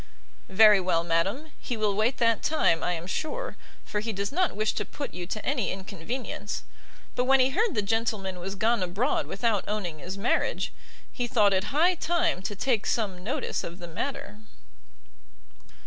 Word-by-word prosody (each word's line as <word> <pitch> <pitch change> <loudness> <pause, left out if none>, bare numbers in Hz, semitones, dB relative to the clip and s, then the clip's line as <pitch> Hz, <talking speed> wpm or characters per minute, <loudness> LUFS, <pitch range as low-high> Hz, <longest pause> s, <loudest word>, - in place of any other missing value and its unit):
"Very 210 +1 +7
well, 170 -2 +1
madam; 195 - 0
he 245 - -4
will 210 -2 +1
wait 220 +5 +1
that 230 -1 +3
time, 235 - +2
I 180 - 0
am 165 0 -4
sure, - - -3 0.3
for 210 - -2
he 225 +2 -2
does 200 +2 -3
not 360 - +1
wish 215 +1 +1
to - - -1
put 285 - -6
you 175 -1 -5
to 215 +3 -4
any 265 -6 0
inconvenience. 205 +4 -5 0.5
But 250 - +1
when 270 +1 +5
he 260 +1 +4
heard 420 - +1
the 210 - +1
gentleman 200 -3 -1
was 195 +3 -4
gone 225 +2 +2
abroad 195 +10 0
without 210 -1 0
owning 190 -7 -3
his 185 +5 -6
marriage, 215 +5 0 0.4
he 245 -2 -2
thought 210 -4 +4
it 190 0 +1
high 330 +6 +3
time 340 - 0
to 205 +2 -4
take 230 0 0
some 195 -6 -1
notice 225 - -2
of 170 - -6
the 175 -2 -8
matter." 210 - -5
215 Hz, 180 wpm, -27 LUFS, 190-255 Hz, 0.5 s, Very